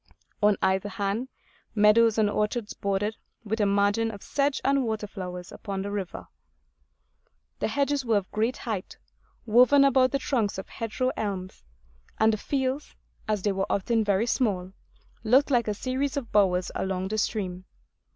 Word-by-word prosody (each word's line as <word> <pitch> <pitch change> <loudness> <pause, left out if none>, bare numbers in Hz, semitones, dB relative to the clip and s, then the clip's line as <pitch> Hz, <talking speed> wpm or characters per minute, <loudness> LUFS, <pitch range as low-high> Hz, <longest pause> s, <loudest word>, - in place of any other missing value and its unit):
On 210 -1 +4
either 190 +1 +1
hand, 205 +4 -2 0.5
meadows 215 +1 +5
and 215 -1 +4
orchards 210 +2 -1
bordered, 200 +2 -2 0.3
with 220 +1 -2
a 205 - +3
margin 205 +3 +2
of 205 -3 -9
sedge 280 0 0
and 275 0 +3
water 220 -2 -2
flowers, 180 -3 -7
upon 195 -2 -5
the 200 - -4
river. 195 -3 -5 1.3
The - - 0
hedges 285 -1 0
were 230 -3 +2
of 195 -2 -4
great 225 +4 0
height, 210 -6 -5 0.5
woven 250 +5 +6
about 260 -1 +4
the 275 - 0
trunks 235 -8 -1
of 190 - -6
hedgerow 230 +3 -2
elms; 195 -3 -4 0.5
and 220 0 +4
the - - 0
fields, 265 +4 -2 0.3
as 210 -3 -1
they 205 - +2
were 195 0 -2
often 225 +3 +1
very 205 +1 +2
small, 195 -7 0 0.5
looked 260 +6 +4
like 240 -3 +2
a 210 - +1
series 265 +5 -2
of 245 -5 -4
bowers 185 -3 +2
along 190 0 -2
the 215 +1 -1
stream. 185 -4 -2
215 Hz, 160 wpm, -27 LUFS, 200-245 Hz, 1.3 s, woven